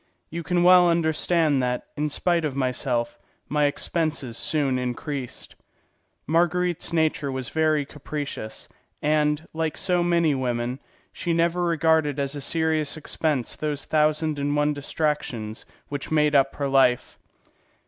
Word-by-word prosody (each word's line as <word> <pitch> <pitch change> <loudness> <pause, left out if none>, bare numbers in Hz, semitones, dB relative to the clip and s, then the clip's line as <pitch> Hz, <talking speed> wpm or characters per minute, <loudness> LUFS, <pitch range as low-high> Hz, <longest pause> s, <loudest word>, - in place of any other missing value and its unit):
You 170 +2 -4
can 175 +2 +1
well 180 -1 +7
understand 160 -3 +2
that, 125 -1 -1
in 150 +1 -1
spite 170 +3 +1
of 145 -4 -2
myself, 125 -2 -1 0.3
my 150 0 +2
expenses 145 -4 -1
soon 140 -1 0
increased. 125 +1 -5 0.7
Marguerite's 175 +2 +1
nature 155 -4 +1
was 130 -2 -4
very 155 -2 +1
capricious, 145 -6 -6 0.4
and, 150 +1 +1
like 160 -1 -2
so 180 -2 +1
many 170 -3 +2
women, 125 -1 -2 0.3
she 170 - -2
never 170 +1 +1
regarded 160 -3 +2
as 140 -1 -1
a 145 - -5
serious 155 +1 0
expense 150 -4 -1
those 150 -2 -3
thousand 155 0 +1
and 145 +1 0
one 150 0 +2
distractions 145 -7 -3 0.2
which 145 -1 -5
made 150 -1 +2
up 135 -1 +3
her 140 - -1
life. 135 -3 +2
150 Hz, 135 wpm, -25 LUFS, 135-160 Hz, 0.7 s, well